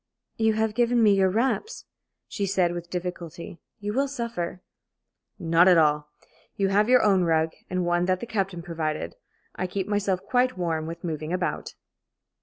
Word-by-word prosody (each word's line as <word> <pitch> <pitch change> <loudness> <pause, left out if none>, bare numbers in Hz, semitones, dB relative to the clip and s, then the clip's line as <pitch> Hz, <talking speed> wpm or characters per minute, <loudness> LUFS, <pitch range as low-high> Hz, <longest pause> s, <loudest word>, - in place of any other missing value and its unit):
"You 220 -1 +3
have 220 0 0
given 240 0 +2
me 210 -2 +6
your 190 -1 +3
wraps," 235 - -1 0.4
she 200 -2 -3
said, 185 -2 +2
with 175 0 -6
difficulty. 175 -2 -6 0.2
"You 210 0 -4
will 275 +4 +1
suffer." 230 -10 -4 0.7
"Not 165 +2 +4
at 180 -2 +7
all. 150 -1 +2 0.5
You 195 -1 +1
have 210 +3 +3
your 255 -1 +6
own 195 -3 +4
rug, 160 -1 +2 0.2
and 185 -1 -1
one 175 0 +1
that 185 0 +1
the - - -5
captain 195 -6 -2
provided. 155 - -3 0.4
I 185 - -2
keep 190 +1 -3
myself 205 -3 0
quite 255 -3 +1
warm 165 -3 -1
with 165 +1 -7
moving 155 -2 -4
about." 180 0 -2
185 Hz, 170 wpm, -26 LUFS, 170-210 Hz, 0.7 s, at